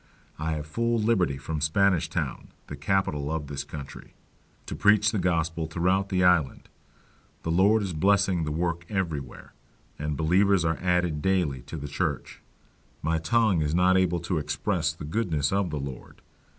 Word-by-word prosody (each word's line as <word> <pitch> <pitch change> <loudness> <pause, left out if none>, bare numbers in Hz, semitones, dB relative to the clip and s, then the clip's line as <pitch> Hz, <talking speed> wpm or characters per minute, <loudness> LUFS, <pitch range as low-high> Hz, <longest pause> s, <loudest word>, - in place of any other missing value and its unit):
I 80 +1 -1
have 75 -1 -4
full 115 +9 0
liberty 105 -11 +1
from 75 +2 -4
Spanish 90 +3 +2
Town, - - -3 0.2
the 75 - -7
capital 75 -2 -1
of 80 -2 -2
this 70 0 -5
country, 70 -1 -10 0.5
to - - -5
preach 105 0 +4
the 110 - -1
Gospel 85 -2 0
throughout 90 +4 0
the 90 -1 +1
Island: 90 -7 +2 0.7
the 80 - -2
Lord 100 +5 +4
is 95 -3 -3
blessing 95 +1 +2
the 75 - -3
work 85 +2 -2
everywhere, 80 - -4 0.5
and 75 -1 -3
believers 90 +3 +3
are 80 -1 0
added 90 -4 +1
daily 90 -9 0
to 80 - -6
the 70 -1 -6
church. 70 - -3 0.6
My 80 +1 +1
tongue 110 -1 +2
is 75 +1 0
not 90 +1 +4
able 90 -2 +2
to 85 -1 -1
express 80 +3 -1
the 80 -2 -9
goodness 80 -5 -1
of 100 -2 +1
the 75 -2 -3
Lord. 70 -2 -8
85 Hz, 165 wpm, -26 LUFS, 75-95 Hz, 0.7 s, preach